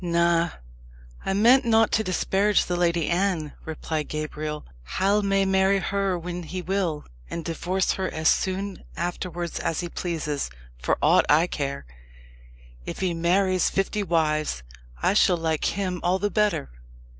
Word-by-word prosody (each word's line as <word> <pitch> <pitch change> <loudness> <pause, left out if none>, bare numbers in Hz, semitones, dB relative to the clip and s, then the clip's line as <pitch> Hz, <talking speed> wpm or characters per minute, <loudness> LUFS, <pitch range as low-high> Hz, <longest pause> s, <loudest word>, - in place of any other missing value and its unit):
"Na 170 0 +2 0.7
I 195 - -1
meant 235 +7 +5
not 225 -1 +4
to 220 - +2
disparage 195 +2 +2
the 180 - -2
Lady 170 -2 +1
Anne," 175 -4 0
replied 155 -1 -3
Gabriel. 155 0 -4 0.3
"Hal 200 +2 +3
may 195 -1 +2
marry 190 +1 +3
her 195 -1 0
when 175 +1 -5
he 175 +2 -5
will, 180 -4 -1 0.2
and 165 -2 -5
divorce 180 +3 0
her 190 -1 -2
as 160 0 -1
soon 190 +1 0
afterwards 175 0 -3
as 165 - -1
he 175 - -4
pleases, 155 - -3 0.3
for - - +1
aught - - +5
I 155 +3 +5
care. 140 - -4 1.0
If - - -6
he 185 -2 +1
marries 185 +2 +2
fifty 195 +2 -1
wives, 155 - 0 0.4
I - - +3
shall 190 -3 +4
like 160 -2 -1
him 185 -3 -2
all 180 +2 +2
the 205 +2 -1
better. 210 - +1
175 Hz, 150 wpm, -25 LUFS, 165-195 Hz, 1.0 s, meant